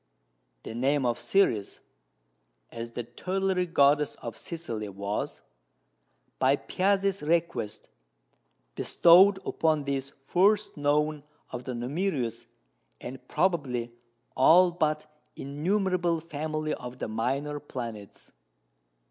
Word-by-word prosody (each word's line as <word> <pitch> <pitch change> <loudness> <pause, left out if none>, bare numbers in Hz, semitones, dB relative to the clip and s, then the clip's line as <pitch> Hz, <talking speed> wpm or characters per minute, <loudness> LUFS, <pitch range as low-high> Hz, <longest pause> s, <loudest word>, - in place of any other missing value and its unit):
The - - -7
name 135 +3 +1
of 120 -1 0
Ceres 120 - +1 0.9
(as 115 0 -7
the 120 - -4
tutelary 185 +9 -1
goddess 145 -2 +3
of 115 -2 -7
Sicily) 115 - -5
was, 100 +2 -4 1.0
by 130 +2 +4
Piazzi's 195 +4 0
request, 160 -9 -1 0.9
bestowed 190 +4 +6
upon 155 -2 +1
this 140 -1 -2
first 195 +10 +1
known 150 +1 +1 0.3
of 125 0 -6
the 125 - -4
numerous, 125 - -2 0.5
and 130 0 -9
probably 130 -10 0 0.4
all 175 +7 +6
but 155 -3 0 0.3
innumerable 175 +3 0
family 155 -1 -3
of 125 0 -7
the - - -4
minor 135 +7 -2
planets. 115 -8 -8
145 Hz, 100 wpm, -28 LUFS, 125-170 Hz, 1.0 s, bestowed